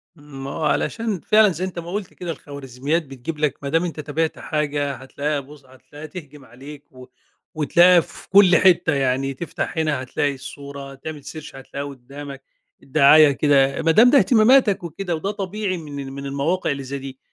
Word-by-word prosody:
ما 140 -2 -9
هو 160 - -5
علشان 220 +5 -1
فعلًا 215 +4 +4
زي 180 +2 -3
أنت 180 -2 -6
ما 170 +1 -8
قُلت 200 -1 -5
كده 175 -2 -5
الخوارزميات 140 +2 -4
بتجيب 135 +4 -7
لك، 150 -3 0
ما 140 - -3
دام 165 +4 +1
أنت 165 -3 -6
تابعت 155 +2 -2
حاجة 145 -2 -2
هتلاقيها 140 +3 -3
بُص، 140 0 -14
هتلاقيها 145 +4 -13
تهجم 150 -4 -11
عليك 140 +5 -13
و 130 -1 -13 0.5
وتلاقيها 175 +4 +5
في - - -9
كُل 190 -2 +6
حتة 175 -4 +4
يعني 135 0 0
تفتح 165 +3 -5
هنا 150 -5 0
هتلاقي 140 +3 -1
الصورة، 140 +1 -9
تعمل 150 +1 -8
search 155 -2 -9
هتلاقيها 140 +2 -7
قُدامك، 140 +1 -10 0.4
الدعاية 145 +1 +6
كده، 140 0 +2
ما 165 - +3
دام 225 +8 +6
ده 280 - +5
اهتماماتك 230 -5 +4
وكده 170 +1 -4
وده 195 +6 -3
طبيعي 200 -1 -3
من 145 -3 -8
ال 135 - -8
من 140 0 -7
المواقع 140 +5 -1
اللي 140 -1 -4
زي 140 +2 -5
دي. 135 -1 -9
150 Hz, 180 wpm, -21 LUFS, 140-170 Hz, 0.5 s, كُل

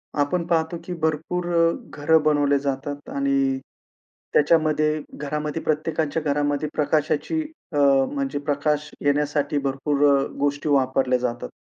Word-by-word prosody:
आपण 160 +4 0
पाहतो, 165 0 0
की 180 - -4
भरपूर 160 +3 -1
अ, 165 0 +4 0.3
घरं 160 +2 +4
बनवले 145 -2 +3
जातात 140 +1 -4
आणि 135 -1 +1 0.7
त्याच्यामध्ये, 155 0 +3 0.2
घरामध्ये 150 +2 -3
प्रत्येकाच्या 155 0 -1
घरामध्ये 145 +1 0
प्रकाशाची 150 - 0 0.3
अ, - - -1 0.4
म्हणजे 140 0 -2
प्रकाश 145 +1 -1 0.2
येण्यासाठी 145 +1 +1
भरपूर 140 +2 0
अ, 135 -1 +3 0.2
गोष्टी 145 +1 0
वापरल्या 130 -2 +2
जातात. 120 -1 -3
145 Hz, 120 wpm, -23 LUFS, 140-155 Hz, 0.7 s, अ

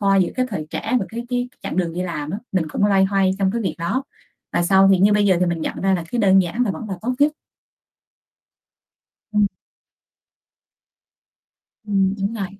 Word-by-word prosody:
thoa 195 -1 +3
giữa 185 -2 +2
cái 255 0 0
thời 155 -8 -4
trẻ 250 - -1
và - - -1
cái 235 +1 -6
cái 245 0 -1
chặng - - -4
đường 175 -3 0
đi 180 - -2
làm 155 -4 -4
á. 200 - -3
Mình 175 -4 0
cũng 205 - +1
loay 195 -2 +4
hoay 195 -1 +2
trong 195 -1 +2
cái 235 - -1
việc 185 -6 -2
đó 240 +11 -1 0.5
và - - +1
sau 190 +2 +5
thì 190 - +4
như 200 +3 +5
bây 205 0 +3
giờ 190 -2 +4
thì 180 - +3
mình 170 -1 -1
nhận - - -4
ra 195 0 +2
là, 175 -3 -3
cái, 245 - -1
đơn 195 -3 +5
giản 180 +8 -2
là 215 - 0
vẫn 215 +2 -6
là 190 - -5
tốt 250 +3 -1
nhất. 295 +1 +4 2.0
Ừm. 210 -1 +3 2.4
Ừm, 195 -2 +1
đúng 200 +3 -2
rồi. 200 -4 -3
195 Hz, 210 wpm, -21 LUFS, 185-210 Hz, 2.4 s, sau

